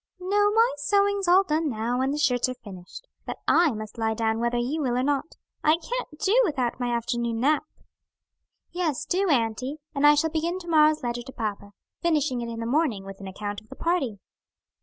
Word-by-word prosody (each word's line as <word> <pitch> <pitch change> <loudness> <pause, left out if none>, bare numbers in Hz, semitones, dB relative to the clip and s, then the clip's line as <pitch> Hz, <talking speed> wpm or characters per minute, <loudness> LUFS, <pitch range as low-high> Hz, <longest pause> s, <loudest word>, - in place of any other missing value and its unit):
"No, 410 +3 +2
my 455 +3 +3
sewing's 400 +4 +1
all 365 +2 +6
done 315 -3 0
now 235 +1 -1
that 265 +1 +1
the 290 - -2
shirts 255 -4 +2
are 255 - -4
finished. 200 - -11 0.2
But - - -4
I 340 -1 +5
must 215 +1 -7
lie 220 0 0
down 220 0 0
whether 235 +1 0
you 265 +7 -1
will 250 -3 0
or 250 - +1
not. 285 +2 -1 0.3
I 310 +2 +4
can't 405 -3 -5
do 420 +7 +3
without 265 - -1
my 245 -1 -1
afternoon 235 -1 -1
nap." 300 +4 +2 1.1
"Yes, 340 -6 -1
do, 385 +1 0
auntie; 255 +1 0 0.2
and 290 0 +4
I 295 - +7
shall 320 +2 +1
begin 335 +3 -1
to 360 -2 -10
morrow's 310 -2 +4
letter 240 0 -2
to 250 - -10
papa; 205 -4 -5 0.3
finishing 300 -7 +1
it 235 0 -4
in 230 - -6
the - - -3
morning 240 -6 0
with 195 0 -9
an 195 - -8
account 205 +2 -5
of 215 - -25
the 265 - -10
party." 330 - -1
270 Hz, 205 wpm, -26 LUFS, 235-330 Hz, 1.1 s, I